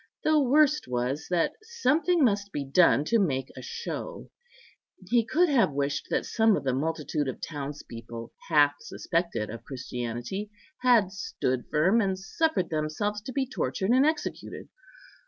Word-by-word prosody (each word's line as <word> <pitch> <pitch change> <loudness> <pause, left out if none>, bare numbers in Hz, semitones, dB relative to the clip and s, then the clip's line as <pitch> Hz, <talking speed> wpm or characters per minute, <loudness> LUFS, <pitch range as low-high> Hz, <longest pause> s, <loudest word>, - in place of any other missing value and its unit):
The 310 0 +4
worst 295 - +3
was, 125 +4 -2
that 175 -2 +1
something 360 -7 +1
must 200 -4 +1
be 145 -5 -3
done 145 +1 +4
to 230 +7 +2
make 135 -9 0
a - - -8
show; 470 +1 -6 0.8
he 235 +3 +3
could 335 +11 +2
have 235 - +3
wished 140 0 -1
that - - 0
some 225 -2 +3
of - - -5
the 130 -2 0
multitude 150 +1 -1
of 130 - -4
townspeople, 120 -6 -7 0.2
half 145 -3 +5
suspected 170 - -2
of 115 - -8
Christianity, 125 - -5 0.3
had 235 -7 +4
stood 130 - -2
firm, 185 +10 +3
and 190 -2 0
suffered 195 - -1
themselves 160 +7 -2
to 235 - -7
be 270 +1 0
tortured 190 - -2
and 260 +2 +5
executed. 310 +1 -2
180 Hz, 150 wpm, -27 LUFS, -, 0.8 s, half